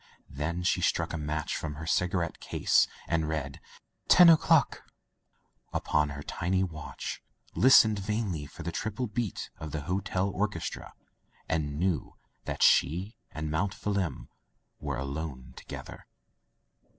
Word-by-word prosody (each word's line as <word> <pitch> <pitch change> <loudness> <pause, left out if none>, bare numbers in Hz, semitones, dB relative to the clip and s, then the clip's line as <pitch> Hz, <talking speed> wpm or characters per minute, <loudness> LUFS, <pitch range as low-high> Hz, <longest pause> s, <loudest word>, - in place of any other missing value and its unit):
Then 80 +5 -3
she - - +2
struck - - +1
a - - -1
match 75 0 -2
from 75 -2 -4
her 80 +2 -7
cigarette 90 0 0
case, - - +2 0.2
and 80 -2 0
read 75 -3 -3 0.5
"ten 180 -1 +9
o'clock, 160 -3 +4 0.9
upon 75 -1 +1
her 70 0 -7
tiny 95 +5 0
watch, 80 -5 -6 0.3
listened 110 -5 +6
vainly 100 -7 -2
for - - -10
the 85 - -3
triple 110 +8 -3
beat 115 -2 -3
of 75 -1 -6
the 75 0 -3
hotel 95 +4 -1
orches 95 -5 -1
tra, - - -10 0.5
and 75 -3 -1
knew 90 -2 -1 0.3
that - - -1
she 90 - +3 0.2
and 80 0 -4
Mount 95 +5 0
Phelim 100 -5 -2 0.5
were 70 -4 -3
alone 70 -1 -5
together. - - -9
85 Hz, 135 wpm, -29 LUFS, 75-100 Hz, 0.9 s, ten